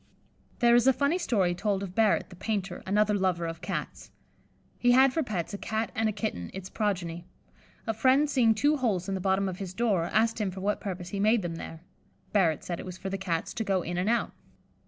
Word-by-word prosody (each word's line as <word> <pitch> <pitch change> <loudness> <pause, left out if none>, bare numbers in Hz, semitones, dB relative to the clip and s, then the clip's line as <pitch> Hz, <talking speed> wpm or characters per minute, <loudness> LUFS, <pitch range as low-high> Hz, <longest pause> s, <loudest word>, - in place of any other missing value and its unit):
There 235 -1 +4
is 240 +2 +5
a 265 - +7
funny 280 +7 +1
story 195 - +1
told 195 +2 -1
of 185 -2 -6
Barrett, 215 -1 +2
the - - -10
painter, 195 +1 -3
another 210 +2 +3
lover 185 -4 0
of 165 0 -5
Cats. - - -5 0.7
He 245 0 +4
had 265 +1 +6
for 325 - +1
pets 205 - -3
a 200 - -4
Cat 220 0 -2
and 225 -2 +1
a - - 0
kitten, 200 - -4
its 190 -1 -7
progeny. 175 -5 -2 0.6
A 225 - 0
friend 260 +6 +3
seeing 240 -6 +3
two 290 +7 +2
holes 205 -9 0
in 195 - -2
the 190 - -2
bottom 190 +1 +1
of 185 -1 -5
his 185 -2 -6
door, 200 -7 +1
asked 225 +3 +1
him 205 - 0
for 190 +1 -7
what 205 +2 -1
purpose 180 -3 -5
he 200 - -4
made 215 +1 +3
them 165 -1 -4
there. 165 -1 -8 0.5
Barrett 170 -7 +2
said 175 -1 -4
it - - -7
was 180 0 -7
for 190 +1 -5
the 195 - -1
Cats 170 -4 -2
to 225 - -2
go 195 -4 0
in 175 +1 -3
and 185 +4 0
out. 235 0 +1
200 Hz, 230 wpm, -28 LUFS, 180-225 Hz, 0.7 s, a